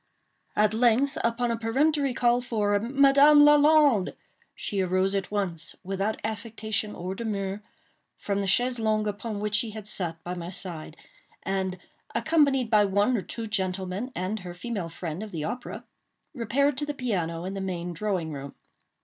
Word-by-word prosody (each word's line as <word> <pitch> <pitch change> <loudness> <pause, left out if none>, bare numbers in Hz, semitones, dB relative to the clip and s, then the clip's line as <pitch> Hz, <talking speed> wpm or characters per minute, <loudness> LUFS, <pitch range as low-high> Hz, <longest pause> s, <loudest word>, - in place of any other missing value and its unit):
At 210 0 +3
length, 245 +5 +3
upon 235 +1 +1
a 230 - -1
peremptory 275 +3 +1
call 240 0 +3
for 210 -4 +1
"Madame 280 +5 +6
Lalande," 295 -7 +5 0.4
she 200 -2 -2
arose 185 +1 +1
at 195 -1 -1
once, 190 -6 -2
without 195 +3 -2
affectation 220 -1 -3
or 180 +2 -4
demur, 200 -2 -3 0.6
from 200 -1 -2
the 195 - -2
chaise 245 +5 +2
longue 215 -1 +1
upon 210 +1 -4
which 210 0 -3
she 220 +2 +3
had 215 - -7
sat 175 -5 -4
by 180 - -4
my 175 -1 -6
side, 170 -4 -6 0.5
and, 190 -1 -1 0.4
accompanied 280 -7 +2
by 210 -1 +6
one 205 +5 +2
or 215 - 0
two 230 +4 -5
gentlemen 190 +2 -2
and 185 +5 -2
her 180 -2 -8
female 195 -3 -4
friend 165 +1 -5
of 215 - -6
the 160 -3 -4
opera, 245 +11 -5 0.5
repaired 265 +3 +1
to 295 - -1
the 295 - -3
piano 175 -10 -2
in 190 - -4
the 195 - -4
main 175 -2 -3
drawing 180 -3 -2
room. 140 0 -7
210 Hz, 165 wpm, -27 LUFS, 185-240 Hz, 0.6 s, Madame